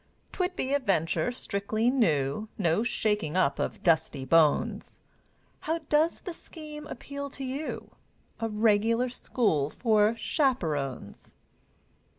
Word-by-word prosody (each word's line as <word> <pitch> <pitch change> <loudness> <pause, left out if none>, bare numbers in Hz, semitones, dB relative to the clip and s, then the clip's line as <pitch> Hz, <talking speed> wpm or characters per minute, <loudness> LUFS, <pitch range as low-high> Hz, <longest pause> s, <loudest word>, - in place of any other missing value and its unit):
'Twould 360 0 -2
be 265 -4 -1
a 285 - +3
venture 195 - +1
strictly 220 0 -1
new, 160 - +1
No 170 0 +2
shaking 210 -8 0
up 165 -7 +2
of - - -3
dusty 160 -5 +2
bones; 155 +1 +2 0.6
How 320 +2 -1
does 310 +3 +2
the 360 - -6
scheme 305 -2 -10
appeal 280 +3 -6
to 275 - -8
you? 270 +4 -5 0.5
A 225 -1 -1
regular 225 +3 +2
school 205 - 0
for 215 +2 +2
chaperones! 160 - -2
220 Hz, 120 wpm, -28 LUFS, 165-270 Hz, 0.6 s, a